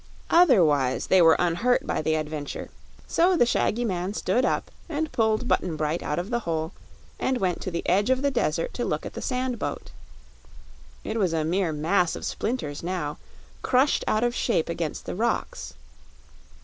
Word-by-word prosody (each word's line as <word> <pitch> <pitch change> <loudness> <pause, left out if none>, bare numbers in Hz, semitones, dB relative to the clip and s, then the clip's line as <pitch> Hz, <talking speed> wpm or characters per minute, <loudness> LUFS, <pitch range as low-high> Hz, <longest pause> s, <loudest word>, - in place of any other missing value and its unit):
Otherwise 165 - +4
they 190 - +5
were 165 -1 +7
unhurt 180 +9 +1
by - - -1
the 155 +1 +1
adventure; 150 -2 -4 0.3
so 355 +2 +3
the 240 - +5
shaggy 240 0 +1
man 185 -1 -2
stood 250 - +1
up - - 0 0.2
and 315 -1 -2
pulled 220 +1 +1
Button 175 -8 +1
Bright 155 +2 -1
out 150 - -2
of 180 +5 -3
the 240 - +1
hole 160 -6 -2 0.5
and 260 -1 0
went 185 -6 -1
to - - -3
the 170 -1 -4
edge 200 +6 +2
of 260 +1 +2
the 280 - +2
desert - - -1
to - - -3
look - - -2
at - - -6
the - - -6
sand 250 -2 -2
boat. - - -4 1.1
It 220 +1 -3
was 185 -5 +1
a 160 -1 0
mere 175 +1 0
mass 165 +4 +1
of - - -6
splinters 155 - -3
now, 170 -4 -3 0.4
crushed 260 +3 +2
out 215 +2 +2
of 240 0 +1
shape 225 -10 0
against 165 -2 -3
the - - -4
rocks. 235 - -2
190 Hz, 180 wpm, -25 LUFS, 160-245 Hz, 1.1 s, were